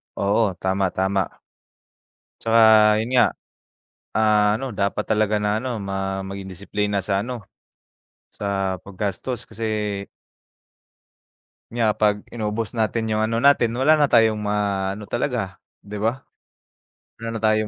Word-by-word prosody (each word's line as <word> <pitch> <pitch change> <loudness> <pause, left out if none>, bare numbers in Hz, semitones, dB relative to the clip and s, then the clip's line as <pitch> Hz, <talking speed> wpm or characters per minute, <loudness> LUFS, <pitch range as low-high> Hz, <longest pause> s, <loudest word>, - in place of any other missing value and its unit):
Oo 100 0 +1
tama, 95 0 0
tama. 95 0 -1 1.0
Tsaka 115 0 +3 0.4
yun 115 - -4
nga. 125 - +6 0.9
Ah, 105 -1 +3
ano 135 -4 -5
dapat 100 +1 -1
talaga 110 -1 +2
na 105 0 +1
ano 125 -3 -3
ma 95 0 -3
maging 100 0 -6
disiplina 100 +2 -2
sa 100 +1 0
ano 125 -1 -5 0.9
sa 95 -2 -2
paggastos 100 +5 -4
kasi 105 -2 -3 1.7
nga 115 -2 +2
pag 105 -1 +1
inubos 110 -2 -3
natin 110 0 -1
yung 110 - +1
ano 115 +2 0
natin 120 -5 +4
wala 150 +5 +4
na 145 - +4
tayong 110 -3 +4
maano 100 -1 -1
talaga, 115 -4 -3 0.2
'di 105 0 -7
ba? 115 +5 -1 1.0
Wala 115 0 -5
na 110 - -4
tayong 110 0 +2
105 Hz, 125 wpm, -22 LUFS, 100-115 Hz, 1.7 s, nga